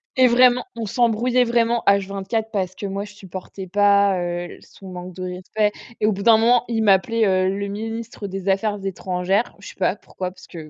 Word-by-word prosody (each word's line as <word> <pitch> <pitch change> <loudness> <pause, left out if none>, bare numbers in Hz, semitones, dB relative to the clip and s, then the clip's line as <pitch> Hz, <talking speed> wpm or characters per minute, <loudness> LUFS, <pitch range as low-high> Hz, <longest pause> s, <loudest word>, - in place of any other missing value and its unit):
Et 255 -1 +6
vraiment, 245 0 +5
on 230 -1 -4
s'embrouillait 240 +3 +2
vraiment 235 0 +1
H 200 -1 +4
24, 215 +3 -3
parce 185 -3 -2
que 205 - -6
moi, 195 +1 -3
je 205 0 -11
supportais 190 0 -9
pas, 200 0 +3
heu, 175 0 -4
son 190 -1 -14
manque 180 0 -8
de 185 - -6
respect. 185 +4 -1 0.3
Et - - +3
au 215 - +3
bout 200 0 -4
d'un 225 +1 +6
moment, 235 +1 +3
il 225 -2 0
m'appelait 220 +3 +3
heu, 185 -1 +2
le 200 +1 -3
ministre 225 +1 -5
des 195 0 -6
affaires 205 +2 +1
étrangères. 190 +3 -1
Je 200 - -10
sais - - -13
pas 190 +1 0
pourquoi, 185 -2 -6
parce 185 0 -16
que 160 -3 -10
200 Hz, 210 wpm, -22 LUFS, 190-225 Hz, 0.3 s, Et